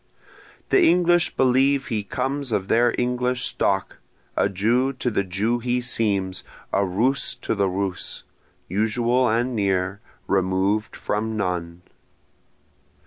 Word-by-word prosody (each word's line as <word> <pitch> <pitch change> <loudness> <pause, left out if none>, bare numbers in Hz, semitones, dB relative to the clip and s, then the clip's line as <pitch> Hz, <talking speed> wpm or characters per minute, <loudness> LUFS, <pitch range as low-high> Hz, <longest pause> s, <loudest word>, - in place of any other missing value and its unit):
The - - +4
English 175 0 +3
believe 135 +1 +2
he 110 -3 -1
comes 130 +5 -3
of 100 -2 -1
their 120 +1 +4
English 125 0 0
stock, - - -1 0.4
A - - +2
Jew 115 +8 +1
to 125 -1 -2
the 100 - 0
Jew 100 +6 -1
he 125 +1 0
seems, 100 -6 0 0.3
a 100 - +3
Russ 120 +8 +1
to 125 - -3
the 100 -3 +1
Russ, 95 -1 -3 0.4
usual 120 +5 +1
and 120 +3 0
near, 95 -1 0 0.3
removed 95 +3 0
from 110 +1 -2
none. 90 -3 -3
110 Hz, 125 wpm, -23 LUFS, 100-125 Hz, 0.4 s, The